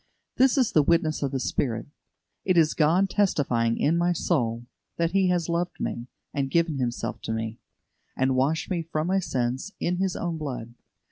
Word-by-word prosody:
This 265 +1 +4
is 255 -4 +3
the 155 - +5
witness 155 0 +1
of 140 - 0
the 135 0 -2
Spirit. 120 -2 -1 0.6
It 185 -2 +2
is 160 -2 +4
God 170 +5 +3
testifying 130 - +1
in 165 +3 +2
my 175 +1 +2
soul 120 -9 -1 0.3
that 170 0 +1
He 190 0 +3
has 175 -2 +1
loved 170 +1 -2
me, 120 +1 -3 0.3
and 140 -1 -1
given 165 -1 +1
Himself 120 -2 -2
for 110 - -2
me, 110 0 -4 0.6
and 130 0 +2
washed 140 +5 +1
me 175 -2 0
from 155 -1 -2
my 190 +2 +2
sins 130 +3 -2
in 175 +1 0
His 190 -1 0
own 170 -2 -3
blood. 125 -6 -5
155 Hz, 185 wpm, -26 LUFS, 130-175 Hz, 0.6 s, the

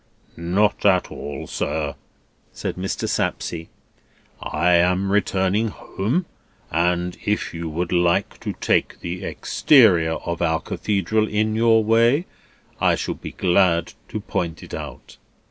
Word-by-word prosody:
"Not 95 +5 +1
at 95 -3 +3
all, 75 0 -6
sir," 75 -3 -2 0.6
said - - -4
Mr. 95 +1 -3
Sapsea. 80 -1 -2 0.7
"I 85 +4 +1
am 90 +3 +3
returning 100 +1 +1
home, 115 - -2 0.5
and 90 +2 +1
if 105 0 -1
you 85 -1 -4
would 85 +3 -3
like 85 -1 +1
to - - -4
take - - 0
the 85 +1 -5
exterior 95 - +4
of 85 +1 -4
our 80 -2 +2
Cathedral 105 +2 -1
in 110 +1 0
your 115 0 +4
way, 115 +9 +3 0.5
I - - +3
shall - - -3
be - - -9
glad 90 -2 +2 0.2
to 110 - -4
point 90 -5 -3
it - - -11
out." - - -8
90 Hz, 130 wpm, -22 LUFS, 85-105 Hz, 0.7 s, exterior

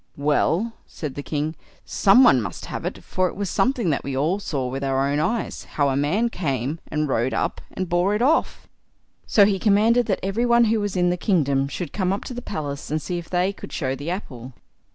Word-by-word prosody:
"Well", 155 +9 +1
said 150 -4 -6
the 145 - -5
king, 150 +2 -3 0.3
"some 200 +7 +5
one 130 - +6
must 105 - -6
have - - -6
it, - - -5
for 185 0 0
it - - -6
was 200 -3 -3
something 240 -9 +1
that 140 - -1
we 135 -1 -3
all 165 +8 +1
saw 140 -10 -3
with 135 +2 -4
our 135 0 +1
own 145 +1 0
eyes, 225 +9 -2
how 145 -2 +2
a 135 - 0
man 175 - +1
came 140 - -2
and 150 -1 -1
rode 130 -1 0
up - - -1
and 185 - -3
bore 175 +4 +2
it 210 - -1
off." 310 +5 +1 0.6
So 205 - +6
he 195 -2 +1
commanded 220 +3 +3
that 195 - 0
every 195 +5 0
one 235 0 +5
who 225 -1 +2
was 205 -2 -2
in 180 0 +3
the 180 - -1
kingdom 140 -8 +1
should 170 +4 -5
come 185 -2 0
up 195 - -2
to - - -7
the 245 - -5
palace 145 -8 -5
and 155 +2 0
see 175 +3 -3
if 170 - -11
they 180 +2 +1
could - - -10
show 130 -4 -2
the 145 +4 -5
apple. 130 - -6
175 Hz, 230 wpm, -23 LUFS, 140-205 Hz, 0.6 s, one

